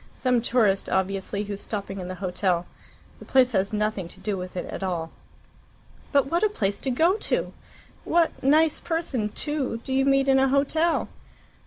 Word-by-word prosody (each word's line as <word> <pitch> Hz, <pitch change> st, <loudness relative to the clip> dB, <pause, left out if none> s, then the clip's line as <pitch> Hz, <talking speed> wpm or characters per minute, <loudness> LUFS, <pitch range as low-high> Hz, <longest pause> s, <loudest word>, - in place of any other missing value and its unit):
Some 250 Hz, -2 st, +2 dB
tourist, 225 Hz, -5 st, +2 dB
obviously, 195 Hz, +2 st, -1 dB
who's 205 Hz, -1 st, -6 dB
stopping 200 Hz, -2 st, -5 dB
in 180 Hz, -, -5 dB
the 185 Hz, -, -5 dB
hotel. 180 Hz, -1 st, -1 dB, 0.5 s
The -, -, -11 dB
place 255 Hz, -1 st, +4 dB
has 195 Hz, -3 st, 0 dB
nothing 210 Hz, -4 st, -1 dB
to -, -, -13 dB
do 210 Hz, -2 st, -2 dB
with 185 Hz, 0 st, -6 dB
it 180 Hz, -, -3 dB
at -, -, -7 dB
all." 170 Hz, -4 st, -2 dB, 1.0 s
"But 280 Hz, -2 st, +4 dB
what 335 Hz, +5 st, 0 dB
a 430 Hz, -, +3 dB
place 200 Hz, -, -1 dB
to 270 Hz, -, -3 dB
go 330 Hz, -, +3 dB
to! -, -, -1 dB, 0.5 s
What 335 Hz, -1 st, +2 dB
nice 310 Hz, +3 st, +4 dB
person, 295 Hz, -10 st, -2 dB
too, 275 Hz, 0 st, -2 dB
do 265 Hz, -, -4 dB
you 270 Hz, 0 st, +3 dB
meet 275 Hz, 0 st, +3 dB
in 265 Hz, 0 st, +5 dB
a 270 Hz, -, +4 dB
hotel?" 290 Hz, +5 st, +1 dB
230 Hz, 180 wpm, -25 LUFS, 195-275 Hz, 1.0 s, in